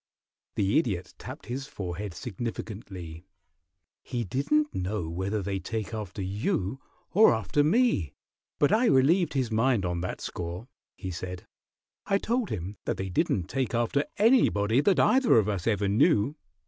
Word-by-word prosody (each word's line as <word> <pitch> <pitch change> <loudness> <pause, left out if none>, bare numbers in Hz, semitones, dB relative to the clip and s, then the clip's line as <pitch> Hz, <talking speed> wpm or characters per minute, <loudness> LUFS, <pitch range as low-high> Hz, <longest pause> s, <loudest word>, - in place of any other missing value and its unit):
The 100 +7 +3
Idiot 100 - -3
tapped - - -9
his 135 +3 -5
forehead 95 -6 -5
significantly. 95 -7 -6 0.8
"He 120 -2 -3
didn't 150 - 0
know 95 -1 -2
whether 95 +5 -2
they 95 0 -2
take 110 +2 -4
after 105 -2 -5
you 100 - -1 0.3
or 210 - +6
after 110 +7 +1
me, 155 - +2 0.4
but 145 - +3
I 230 +4 +4
relieved 160 +3 +4
his 130 -4 0
mind 115 -2 +2
on 85 -1 -2
that 90 - -4
score," 90 +6 -5 0.3
he 95 - -5
said. 90 +1 -6 0.6
"I 195 - +3
told 235 +2 -1
him 95 +1 -5
that - - -1
they 95 0 -3
didn't 90 +1 +1
take 130 +5 -2
after 120 +5 +1
anybody 135 - +4
that 195 +4 +3
either 260 - +5
of 105 -2 +3
us 100 -3 -2
ever 105 -3 +1
knew. 115 - +3
110 Hz, 150 wpm, -28 LUFS, 95-140 Hz, 0.8 s, or